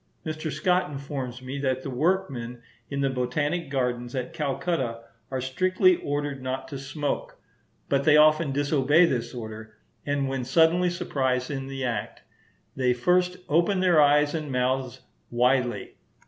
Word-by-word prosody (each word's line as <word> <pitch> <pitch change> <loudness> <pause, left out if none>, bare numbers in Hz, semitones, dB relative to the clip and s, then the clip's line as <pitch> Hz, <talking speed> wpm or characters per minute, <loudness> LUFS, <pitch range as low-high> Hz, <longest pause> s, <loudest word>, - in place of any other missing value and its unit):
Mr. 155 0 -4
Scott 180 +5 +1
informs 135 -3 -6
me 135 +2 -5
that 130 -1 -1
the - - -5
workmen 130 -5 -1 0.3
in 140 -1 -2
the 135 - +2
Botanic 145 +6 -1
Gardens 125 -2 -2
at 125 -1 -4
Calcutta 135 -5 -2 0.3
are 130 - -2
strictly 185 +8 +2
ordered 145 -1 -3
not 130 +1 -4
to 140 -3 -6
smoke; 140 +2 -4 0.5
but 140 0 +1
they 150 +1 +6
often 155 0 +5
disobey 145 +3 +3
this 125 -8 -1
order, 110 -2 -8 0.3
and 145 -1 -1
when 135 -1 -2
suddenly 165 +7 +3
surprised 130 -6 -1
in 135 -1 -4
the 135 -1 -4
act, 115 -5 -4 0.5
they 125 -2 +2
first 180 +7 +2
open 170 +6 +2
their 180 -4 +5
eyes 145 0 +4
and 155 -3 -3
mouths 130 0 -1 0.3
widely. 125 +1 +1
140 Hz, 150 wpm, -26 LUFS, 130-155 Hz, 0.5 s, they